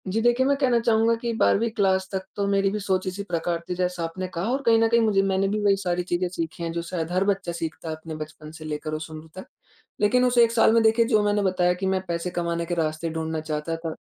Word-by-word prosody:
जी, 210 +4 0
देखिए 240 +2 +3
मैं 280 +1 +3
कहना 255 -4 +2
चाहूँगा 230 0 +3
कि 235 - -1
12वीं 230 +2 +3
क्लास 190 -3 +1
तक 190 -1 -2
तो 200 - -1
मेरी 195 0 +2
भी 210 - -2
सोच 190 -2 -1
इसी 190 +2 -3
प्रकार 170 -2 -2
थी 180 - -1
जैसा 180 -1 -1
आपने 185 +3 -4
कहा 180 +3 -3
और 270 +2 0
कहीं 225 -1 +5
न 225 - +4
कहीं 235 +1 +4
मुझे 210 -3 +3
मैंने 195 0 +1
भी 210 +2 -1
वही 200 -1 +4
सारी 180 -2 -1
चीजें 175 +1 -1
सीखी 170 -1 -5
हैं 165 - -2
जो 170 0 -3
शायद 170 -1 -4
हर 185 +1 +2
बच्चा 195 -3 0
सीखता 165 -1 -5
है 160 - -3
अपने 160 0 -8
बचपन 155 0 -9
से 160 0 -10
लेकर 155 0 -4
उस 155 +1 -5
उम्र 155 0 -9
तक। 190 - -8 0.6
लेकिन 250 +4 +4
उस 250 0 +1
1 235 -1 +6
साल 225 -1 +4
में 230 - +5
देखिए 225 +1 +4
जो 220 -3 +3
मैंने 205 0 +1
बताया 185 -2 +2
कि 180 +2 -4
मैं 190 0 +1
पैसे 170 +1 -2
कमाने 170 0 -1
के 175 +1 -2
रास्ते 160 0 -1
ढूँढ़ना 160 0 -3
चाहता 155 +1 -3
था, 165 -1 -5
185 Hz, 265 wpm, -25 LUFS, 165-210 Hz, 0.6 s, 1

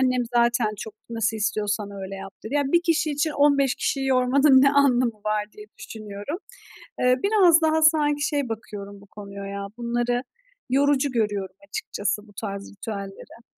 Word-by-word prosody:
annem 255 -1 +2
zaten 235 -1 +3
çok, 220 +1 -7 0.2
"Nasıl 225 -1 -1
istiyorsan 210 -1 -1
öyle 195 -1 -7
yap." 195 0 -8
dedi. 225 - -5
"Ya, 290 - +3
1 340 +5 +3
kişi 325 -2 +1
için 295 +2 0
15 280 -3 +3
kişiyi 270 -1 -1
yormanın 265 +1 +5
ne 275 - +6
anlamı 250 -6 +3
var?" 215 0 0
diye 210 0 -12
düşünüyorum. 215 - -7 0.6
Eee, 250 0 +4
biraz 370 -6 +5
daha 315 0 +2
sanki 300 -2 +3
şey 285 -5 -1
bakıyorum 200 -2 -7
bu 200 - -17
konuya 200 -1 -9
ya, 200 0 -5
bunları 240 +1 -1 0.5
yorucu 280 +1 +2
görüyorum 205 -5 -1
açıkçası, 210 - -3
bu 205 - -18
tarz 200 -1 -6
ritüelleri. 200 +2 -8
235 Hz, 160 wpm, -24 LUFS, 205-285 Hz, 0.6 s, ne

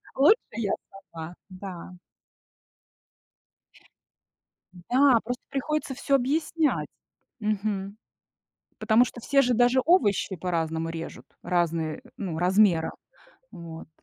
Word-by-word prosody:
лучше 300 - +6 0.2
я 220 -4 -1 0.4
сама. 165 +1 -8
Да. 185 -1 -8 2.8
Да, 245 +8 +3
просто 245 +2 -4
приходится 280 0 -2
всё 275 - 0
объяснять, 300 +4 +1 0.5
мгм, 205 -1 -2 0.8
потому 225 +2 +4
что 240 - -8
все 275 +3 +3
же 245 -1 +2
даже 245 +2 +4
овощи 205 - +3
по-разному 165 -2 -2
режут, 165 0 -7 0.2
разные, 170 -1 0
э, - - -15
ну 175 -6 -4
размера. 180 -2 +3 0.6
Вот. 165 -1 -9
205 Hz, 100 wpm, -26 LUFS, 170-255 Hz, 2.8 s, лучше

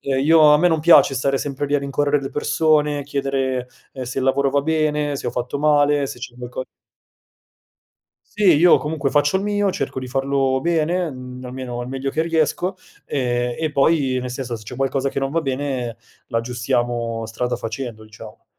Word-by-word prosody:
ehm, 135 -1 -1
io 160 +1 +6
a 150 - +6
me 180 +2 +4
non 160 -2 +1
piace 165 -4 +6
stare 135 +1 0
sempre 145 0 -3
lì 145 - -1
a - - +4
rincorrere 145 +1 0
le 135 - -5
persone, 150 -1 +1
chiedere, 135 -2 -2 0.2
ehm, 130 -1 -6
se 125 +2 -4
il 130 - -1
lavoro 140 +1 +2
va 140 0 +1
bene, 150 -2 0
se - - -6
ho - - 0
fatto 125 +3 -3
male, 145 -1 +3
se 125 - -8
c'è 120 0 -8
qualco 125 +1 -6 1.6
Sì 200 -6 +3
io 175 +3 +6
comunque 150 -2 -2
faccio 145 +4 +2
il 195 - -1
mio, 205 -1 +1
cerco 135 -4 -3
di 130 - -5
farlo 135 0 0
bene, 170 +1 0
mhmm, 125 -1 -9
almeno 125 -1 -6
al 120 - -6
meglio 135 +1 -3
che 160 - 0
riesco, 165 +3 0 0.3
ehm, 120 -2 -1
e 160 -1 -1
poi, 140 -2 +2
nel 125 0 -5
senso, 125 -2 -4
se 110 - -12
c'è 125 +4 -8
qualcosa 135 +1 0
che - - -3
non 135 0 -1
va 165 +2 0
bene 130 -4 -3 0.3
l'aggiustiamo 115 -1 -2
strada 125 +3 -2
facendo, 115 -1 -6
diciamo. 110 0 -13
135 Hz, 190 wpm, -21 LUFS, 125-150 Hz, 1.6 s, io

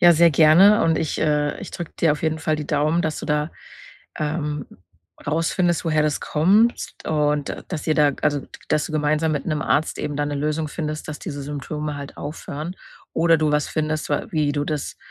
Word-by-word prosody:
Ja, 175 -1 +8
sehr 170 +1 +5
gerne 170 +8 +6
und 165 -1 +2
ich 155 - -2
äh, 150 -1 +1
ich - - -7
drücke 175 -3 -6
dir 160 -3 +4
auf 150 - -5
jeden 160 0 0
Fall 155 0 0
die 150 -1 -4
Daumen, 155 +2 +1
dass 155 -1 -2
du - - -6
da, 150 +1 0 0.7
ähm, 150 -1 -2 0.6
rausfindest, 165 +3 +1
woher 155 -1 +2
das 150 -1 0
kommst 200 +10 +2
und 150 -2 0
dass 160 -5 -5
ihr 155 - +2
da 145 -2 +4
also, 145 -2 +1 0.3
dass 150 - +2
du - - -8
gemeinsam 155 +1 +1
mit 145 -3 -3
'nem 155 -2 -1
Arzt 155 +2 +1
eben 145 - -3
da 145 0 0
'ne 145 - -3
Lösung 150 +2 -1
findest, 155 0 -4
dass 150 - -5
diese 145 -4 -6
Symptome 150 +1 -4
halt 140 -1 -8
aufhören 150 +3 -6 0.4
oder 165 0 +4
du 155 -1 +1
was 150 -1 +2
findest, 155 -1 -2
wa 145 - 0
wie 150 -2 +1
du 145 0 -1
das, 150 -2 -3
155 Hz, 205 wpm, -22 LUFS, 150-160 Hz, 0.7 s, Ja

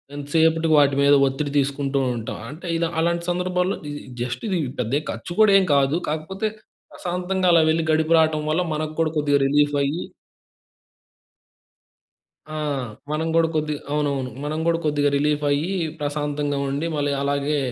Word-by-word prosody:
ఎంతసేపటికి 160 +2 +2
వాటి 140 -1 +4
మీద 140 0 +5
ఒత్తిడి 140 +2 -2
తీసుకుంటుంటాం. 135 -4 -1
అంటే 160 +5 -9
ఇలా 165 0 0
అలాంటి 170 +1 0
సందర్భాల్లో 180 +1 0
ఇది 145 - -6 0.2
జస్ట్ 120 0 -4
ఇది 185 -3 0 0.2
పెద్ద 115 -2 -2
ఏ - - -9
ఖర్చు 115 +10 -7
గూడా 215 -2 +6
ఏం 195 - +3
కాదు. 140 +3 +2
కాకపోతే 160 +7 -3 0.5
ప్రశాంతంగా 180 +1 -2
అలా 165 -1 +6
వెళ్లి, 160 +1 +2
గడిపి 160 +1 +2
రావటం 155 -1 +2
వల్ల 160 +4 +1
మనకు 155 0 -3
గూడా 160 -1 +2
కొద్దిగా 145 -1 +2
రిలీఫయ్యి 145 +2 +1 2.5
ఆ! - - -4 0.6
మనం 155 +2 -1
గూడా 165 0 +4
కొద్దిగా 150 -1 -1
అవునవును. 140 -4 -1
మనం 150 +2 -2
కూడా 165 0 +2
కొద్దిగా 145 -1 +2
రిలీఫయ్యి 145 +2 +1 0.3
ప్రశాంతంగుండి, 145 0 -2
మళ్ళీ 145 -1 0
అలాగే, 140 +1 0
150 Hz, 140 wpm, -23 LUFS, 140-165 Hz, 2.5 s, గూడా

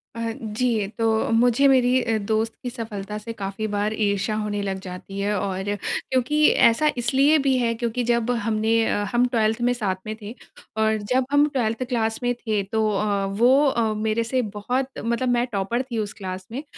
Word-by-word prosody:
अ, 230 0 -2
जी 220 -1 -1
तो 225 - +1 0.2
मुझे 245 +4 +4
मेरी 255 -1 +4
अ, 225 -2 0
दोस्त 220 +2 -1
की 250 - -2
सफलता 210 -4 -6
से 230 +2 -7
काफ़ी 200 0 -4
बार 205 +1 -1
ईर्ष्या 205 0 0
होने 210 -1 -2
लग 195 -1 -3
जाती 190 +1 -8
है। 205 +1 0
और 190 -1 -3 0.5
क्योंकि 265 +4 +2 0.2
ऐसा 235 +7 +3
इसलिए 270 +6 +3
भी 265 -1 +3
है 235 -2 +1
क्योंकि 235 +1 -2
जब 235 0 +1
हमने 220 -1 0
अ, 205 - 0
हम 240 +1 +4
12th 225 -1 0
में 245 +1 +2
साथ 210 -6 -1
में 215 0 -4
थे। 210 +2 -7 0.4
और 220 0 +2
जब 250 +5 0
हम 290 +1 +5
12th 240 -4 -1
क्लास 225 -3 0
में 245 0 +1
थे 220 -4 -1
तो 220 +3 0
अ, 205 -1 0
वो 240 +9 +4
अ, 230 -5 +1
मेरे 215 +1 0
से 255 +3 0
बहुत 240 +4 -2 0.2
मतलब 235 +3 0
मैं 240 0 +2
टॉपर 200 +4 -1
थी, 255 -3 -5
उस 210 -1 -2
क्लास 185 -3 -7
में 265 +5 -5
225 Hz, 195 wpm, -23 LUFS, 210-245 Hz, 0.5 s, हम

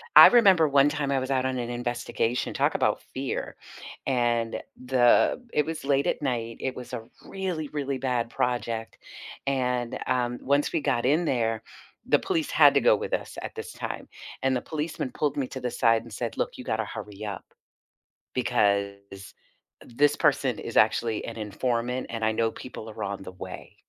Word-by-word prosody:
I - - +13
remember 195 -10 +6
one 140 +1 +5
time 145 -2 -2
I 135 - +2
was 130 +1 -3
out 130 -1 +1
on 130 -1 -1
an 120 -1 -3
investigation- 120 0 -2
talk - - +1
about - - +1
fear- - - -3 0.5
and 120 -3 +1 0.2
the 125 - +4
it 150 - +2
was 160 0 -5
late 140 0 +2
at - - 0
night, 115 -4 -2
it 130 - -3
was 125 0 -9
a 115 -2 -4 0.2
really, 180 -6 -3
really 140 -2 -2
bad 125 -3 -1
project, 115 -2 -2 0.5
and, 125 -3 0
um, 125 -1 0
once 140 +2 +1
we 165 - 0
got 120 - 0
in 155 +6 +3
there, 115 -5 0 0.4
the - - +4
police 330 -7 -1
had - - +7
to - - +5
go - - +6
with 465 +2 -5
us - - -3
at - - -7
this 450 0 -7
time, - - -5 0.4
and 135 0 +2
the 125 - -1
policeman 150 -4 -4
pulled 150 -2 0
me 135 -3 0
to 130 - -7
the 125 -1 -2
side 115 -2 +3
and 115 -3 -12
said, 115 +1 -4
"Look, - - -2
you 125 - -6
gotta 110 0 -1
hurry 105 0 -7
up, 100 -3 -6 0.9
because 100 -5 0 0.5
this 145 +5 +2
person - - +2
is - - -4
actually 115 -2 +2
an - - -7
informant, 120 +4 -2
and 115 -1 -4
I 110 - +3
know 115 +1 +1
people 115 -3 -9
are - - -6
on 100 -1 -4
the 95 - -8
way." 90 - -9
125 Hz, 185 wpm, -27 LUFS, 115-140 Hz, 0.9 s, I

